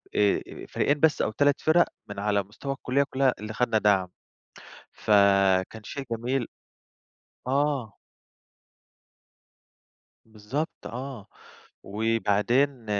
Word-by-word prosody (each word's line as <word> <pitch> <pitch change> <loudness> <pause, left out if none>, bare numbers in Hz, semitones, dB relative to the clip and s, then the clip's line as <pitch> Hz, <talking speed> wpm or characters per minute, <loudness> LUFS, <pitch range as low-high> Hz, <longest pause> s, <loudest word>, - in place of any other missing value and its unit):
آآ، 105 -1 +4
آآ - - -10
فريقين 145 +1 +1
بس 160 0 +3
أو - - 0
3 145 +4 +2
فِرق 165 +2 +4 0.2
من 100 - -6
على 100 0 +1
مستوى 120 +8 -6
الكُلّية 135 +1 0
كلّها 130 -1 +2
اللي 105 +1 -6
خَدنا 115 -1 +1
دَعم، 100 -3 +3 0.9
فكان 100 0 +3
شيء 135 +5 -6
جميل. 120 +2 -1 1.0
آه. 135 -5 0 2.3
بالضبط، 115 +8 -5
آه. 125 -3 -7 0.6
وبعدين 115 +5 +1
115 Hz, 100 wpm, -26 LUFS, 105-135 Hz, 2.3 s, آآ